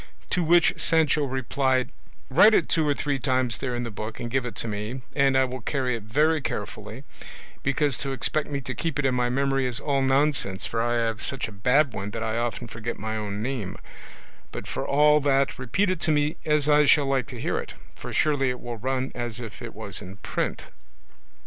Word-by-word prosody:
To 180 - +2
which 170 +1 +5
Sancho 155 -2 +3
replied, 130 0 0 0.4
"Write 205 +11 +6
it 165 - +3
two 160 -2 +1
or 145 - +2
three 140 -1 -1
times 130 -5 0
there 125 -2 -2
in 120 - -2
the 115 - -4
book 110 +2 -6
and 120 -1 -5
give 130 -1 0
it 120 - -7
to - - -4
me, 110 +4 -4
and 135 -1 +4
I 130 - +4
will 130 0 -6
carry 130 0 -1
it 115 - -5
very 150 +9 +2
carefully, 110 +1 -5 0.6
because 140 -1 +1
to 135 - -2
expect 150 +3 -1
me 140 -1 -2
to 130 0 -5
keep 165 0 -2
it 145 - 0
in 130 - +3
my 125 -1 +1
memory 135 0 +1
is 125 +1 -3
all 140 -2 0
nonsense, 135 -7 +1
for 115 - -1
I 120 +1 +1
have 115 -2 0
such 135 -2 -3
a - - -10
bad 125 +7 +2
one 100 +1 -4
that 115 +2 -4
I 110 +1 -1
often 120 0 -2
forget 115 +1 -5
my 110 +1 -3
own 105 -1 -3
name; 115 -8 -3 0.7
but - - -6
for - - -3
all 150 +1 +5
that 140 -2 +1
repeat 185 - +1
it 185 - -2
to 155 - +1
me, 150 0 +1
as 150 -2 +2
I 150 0 +5
shall 145 +1 +5
like 135 -1 0
to 125 -5 -8
hear - - -1
it, - - -7 0.2
for - - -8
surely 145 -4 +2
it 125 - -3
will 120 -1 -6
run 130 +3 -2
as 120 -2 -4
if 115 -2 -8
it 120 -1 -7
was 100 -3 -5
in 95 -1 -9
print." - - -3
130 Hz, 220 wpm, -26 LUFS, 115-145 Hz, 0.7 s, Write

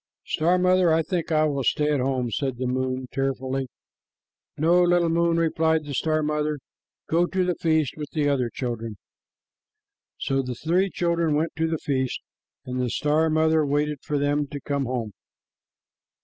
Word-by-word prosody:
"Star 175 +4 +2
mother, 180 -1 +4
I 160 0 +3
think 170 0 -3
I 155 0 +3
will 140 -3 -1
stay 150 +4 +1
at 145 - +1
home," 130 -2 -1
said 135 -2 -2
the 130 - -2
moon 130 0 -1
tearfully. 135 0 -2 0.9
"No, 170 +4 +4
little 175 -1 +3
moon," 170 0 +2
replied 160 -1 +1
the 145 - -6
star 155 +3 0
mother; 150 0 -1 0.5
"go 170 +2 +2
to 185 0 0
the 180 - +1
feast 160 -5 +1
with 150 -1 -5
the 150 -2 0
other 130 -4 +1
children." 115 -4 -4 1.2
So 135 0 0
the 125 -1 -5
three 175 +8 +1
children 170 -3 0
went 160 +2 0
to 160 0 +1
the 160 - 0
feast, 130 -4 -1 0.5
and 125 -1 -3
the 125 - 0
star 155 +5 +1
mother 160 0 +3
waited 145 0 0
for 150 - -2
them 145 +1 +1
to 145 0 -6
come 140 -1 -1
home. 120 -4 -3
150 Hz, 170 wpm, -25 LUFS, 135-165 Hz, 1.2 s, mother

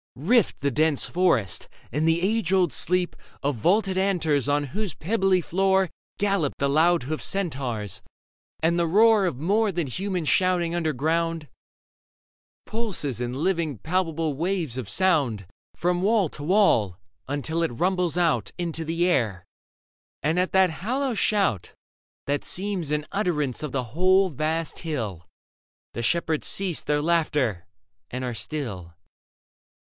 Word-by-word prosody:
Rift 195 - +2
the 140 -1 0
dense 155 +1 +1
forest 165 - 0 0.2
and 150 +5 0
the 165 +1 +2
age 195 -2 0
old 185 -5 +3
sleep 180 +1 +1 0.3
Of 140 0 0
vaulted 190 - +2
antres 160 -8 +1
on 145 0 +1
whose 210 -4 -1
pebbly 195 0 +1
floor 190 +3 +2
Leda 185 - -7 0.2
Gallop 195 -8 +1
the 140 - +1
loud 160 +3 +3
hoofed 155 +4 -4
Centaurs; 130 - -2 0.6
and 165 +2 +2
the 170 -1 +2
roar 215 +3 +5
Of 170 -9 -1
more 205 - +1
than 170 -4 -2
human 180 +4 -3
shouting 175 +2 +2
underground 165 +1 -1 1.2
Pulses 190 - -3
in 120 0 -2
living 165 -6 0
palpable 165 - -1
waves 165 -4 -2
of 120 -6 -5
sound 140 - +1 0.3
From 175 0 0
wall 205 -3 +2
to 145 - -9
wall, 145 - +3 0.3
until 145 +4 -2
it 165 - +1
rumbles 180 +4 0
out 170 -2 +1
Into 165 -2 -3
the 165 +2 0
air; 110 - 0 0.8
and 160 +5 +1
at 185 - 0
that 190 -2 +4
hollow 260 +5 -1
shout 200 - 0 0.5
That 145 +1 -1
seems 185 -5 -2
an 150 0 0
utterance 155 - -1
of 150 - -3
the 130 -1 -1
whole 185 +2 +4
vast 155 +2 -2
hill, 110 - -4 0.7
The 115 - -4
shepherds 160 +4 0
cease 190 -4 -1
their 150 0 0
laughter 150 - 0 0.4
and 125 +1 -4
are 125 - -3
still. 110 - -5
165 Hz, 140 wpm, -25 LUFS, 140-185 Hz, 1.2 s, roar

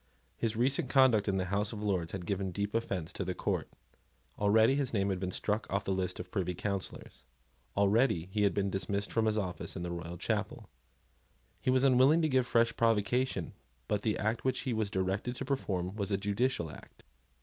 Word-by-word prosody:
His 115 -1 -1
recent 130 +2 +2
conduct 130 -7 +5
in 95 -1 +1
the 95 - 0
House 105 +2 +1
of 105 -2 -6
Lords 90 -5 0
had 95 -3 -5
given 95 0 -1
deep 100 +3 -3
offence 100 -6 -2
to - - -3
the 90 -1 -3
court. - - -2 0.7
Already 110 +4 +5
his 135 -4 -1
name 100 -1 +1
had 95 - -2
been 95 -1 -2
struck 105 +3 -2
out - - -1
of - - -21
the 95 - -2
list 95 -1 -2
of 90 0 -7
Privy 90 -3 -1
Councillors. 100 +1 -5 0.5
Already 100 -3 +3
he 105 - 0
had 100 -1 +3
been 100 -1 0
dismissed 100 +2 -2
from 115 -1 +1
his 110 0 +1
office 95 -4 -3
in 90 - -4
the 90 - -3
royal 85 0 -5
chapel. - - -3 0.9
He - - -1
was 130 +1 +4
unwilling 135 +5 +5
to 155 - +2
give 130 -2 +2
fresh 115 -1 +2
provocation 115 +3 +1 0.3
but 105 - 0
the 110 -1 0
act 110 +2 -1
which 130 - 0
he 130 - -2
was 110 -2 0
directed 95 +6 -1
to 135 - -5
perform 95 -9 -2
was 100 -2 -2
a 100 - +2
judicial 100 - -1
act. - - -14
105 Hz, 205 wpm, -32 LUFS, 95-115 Hz, 0.9 s, conduct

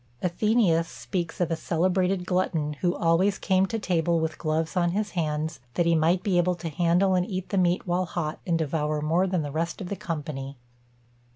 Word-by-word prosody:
Athenæus 180 -2 +2
speaks 170 -2 -4
of 175 -2 0
a - - +2
celebrated 180 +3 0
glutton 170 -5 0
who 175 -1 +1
always 175 +4 +2
came 190 0 +2
to 225 - -2
table 170 -4 +1
with 160 -1 -2
gloves 160 +2 -1
on 175 -1 +2
his 210 -1 -1
hands, 155 -3 -2 0.2
that 175 - +2
he 170 - +3
might 165 +3 +2
be 185 -4 +2
able 180 +1 +2
to 170 -1 -5
handle 175 +4 +2
and 180 0 +1
eat 185 -2 -4
the 200 - -1
meat 180 0 +1
while 180 +1 0
hot, 165 -3 -3
and 170 -2 +2
devour 150 -1 -1
more 170 +5 +2
than 180 -4 0
the 145 - -4
rest 165 +3 -2
of 185 -3 -6
the 200 - -2
company. 145 -6 -5
175 Hz, 200 wpm, -26 LUFS, 160-185 Hz, 0.2 s, he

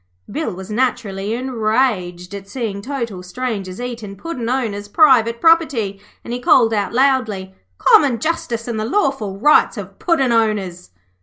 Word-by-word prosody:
Bill 310 -6 -2
was 190 +2 -9
naturally 210 -3 -1
enraged 215 -7 -1
at 200 -1 -8
seeing 215 -5 -4
total 235 -6 -4
strangers 195 -1 -5
eating 230 -5 -6
Puddin' 250 - -5
owners' 220 -6 -2
private 235 -3 +4
property, 265 -12 +2 0.2
and 235 - -6
he 245 - -3
called 235 -2 +4
out 205 -2 -1
loudly: 230 -7 +1 0.2
'Common 270 -6 +4
justice 240 -4 -3
and 230 -2 -3
the 215 - -2
lawful 250 - -1
rights 295 +9 +4
of - - -8
Puddin' 295 -8 +1
owners.' 205 -6 0
230 Hz, 145 wpm, -19 LUFS, 200-260 Hz, 0.2 s, private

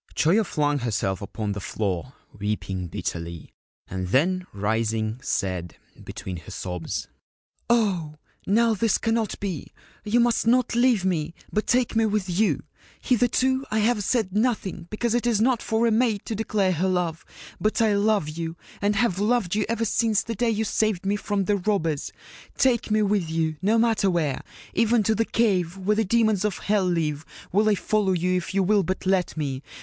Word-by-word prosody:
Choyo 190 +9 +3
flung 145 -5 0
herself 105 -6 -1
upon 105 +1 -4
the 100 - -3
floor, 100 +4 -3 0.2
weeping 100 -3 -3
bitterly, 85 0 -5 0.3
and 95 0 -4
then 180 - +1
rising, 110 +2 -1
said, 95 - -2 0.3
between 95 -2 -6
her 80 - -12
sobs: 90 -3 -4 0.3
' - - -46
Oh, 190 -10 +1 0.3
now, 230 +3 +4
this 220 0 +2
cannot 225 -2 -1
be! 185 -8 -4 0.3
You 225 +3 +2
must 235 -1 +2
not 250 +1 +3
leave 240 -5 +3
me, 170 -3 -1 0.2
but 215 - 0
take 245 -1 +2
me 225 0 +3
with 210 -2 -1
you. 195 +4 +1 0.4
Hitherto 260 +2 +2
I 215 - -1
have 215 0 +2
said 210 -4 0
nothing, 210 -6 -1
because 230 +2 -1
it 240 0 +1
is 230 -4 +2
not 240 +1 +2
for 225 +1 +1
a 230 - +3
maid 220 -2 +1
to - - -3
declare 210 -3 0
her 180 +2 0
love; 175 -3 -1 0.4
but 215 +2 0
I 220 -2 +3
love 205 -4 +2
you, 165 +2 -5 0.2
and 205 +1 +2
have 200 -3 +1
loved 210 -3 +1
you 210 0 0
ever 230 0 0
since 220 -1 +2
the 230 - -4
day 235 +2 0
you 220 0 0
saved 215 -3 0
me 200 +1 +1
from 205 -1 -1
the 205 +1 +2
robbers. 175 -7 -1 0.5
Take 240 -4 +2
me 215 0 +3
with 200 -5 +1
you, 160 -1 -1
no 210 +4 +3
matter 225 -3 +3
where; 160 -7 0 0.3
even 230 0 +3
to 220 - +2
the 225 +1 +1
Cave 190 -7 +1
where 195 +3 +1
the 225 - +2
Demons 220 -1 +2
of 210 -3 -1
Hell 205 -2 +1
live 160 -4 0 0.3
will 210 +4 +3
I 210 - +4
follow 205 -1 +1
you 180 +1 +1
if 180 +1 -3
you 195 - +3
will 205 +2 +3
but 185 +2 -3
let 185 -3 +1
me 135 -4 -2
200 Hz, 185 wpm, -25 LUFS, 160-220 Hz, 0.5 s, now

